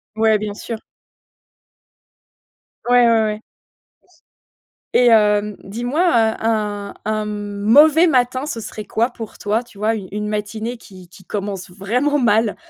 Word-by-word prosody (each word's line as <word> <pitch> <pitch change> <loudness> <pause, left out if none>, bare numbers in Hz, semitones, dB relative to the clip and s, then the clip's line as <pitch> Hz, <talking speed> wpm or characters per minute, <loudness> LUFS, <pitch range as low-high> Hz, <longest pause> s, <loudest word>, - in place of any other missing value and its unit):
Ouais, 220 -1 +3
bien 210 0 -4
sûr. 220 +2 -6 2.1
Ouais, 245 -1 +5
ouais, 230 -1 +4
ouais. 210 - -9 1.5
Et 245 - +4
hem, 210 -2 +3
dis-moi, 245 - -2
heu, 230 -11 +3
un 210 -2 -2
un 215 0 -1
mauvais 210 +11 +4
matin, 255 -1 +1
ce 260 -6 -4
serait 215 -1 -7
quoi 230 +5 0
pour 225 -2 -9
toi, 215 +3 -1
tu 235 -4 -19
vois, 215 +2 0
u 200 -4 -6
une 210 +1 -3
matinée 215 +3 -4
qui 185 -5 -15
qui 180 +2 -17
commence 200 -1 -5
vraiment 240 +11 0
mal? 220 -3 +2
220 Hz, 135 wpm, -19 LUFS, 205-240 Hz, 2.1 s, Ouais